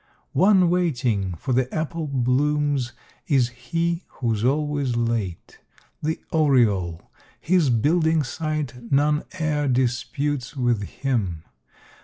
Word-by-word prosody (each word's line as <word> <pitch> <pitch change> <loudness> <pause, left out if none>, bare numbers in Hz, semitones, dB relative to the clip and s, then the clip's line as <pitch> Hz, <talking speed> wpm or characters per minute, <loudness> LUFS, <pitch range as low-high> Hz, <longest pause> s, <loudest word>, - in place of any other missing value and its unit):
One 185 +2 +5
waiting 120 - 0
for 125 +10 -3
the 125 +1 +1
apple 160 0 -3
blooms 140 0 +1 0.3
is 135 -7 +3
he 165 +8 -2
who's 115 -4 -2
always 140 -1 0
late, 115 -7 -2 0.4
The 160 +1 -1
oriole: 110 - +2 0.3
his 175 -4 +2
building 160 +6 +2
site 145 -4 -4
none 150 +2 +2
e'er 150 -2 0
disputes 130 +2 -1
with 120 -4 +1
him. 100 - -2
135 Hz, 105 wpm, -23 LUFS, 120-155 Hz, 0.4 s, One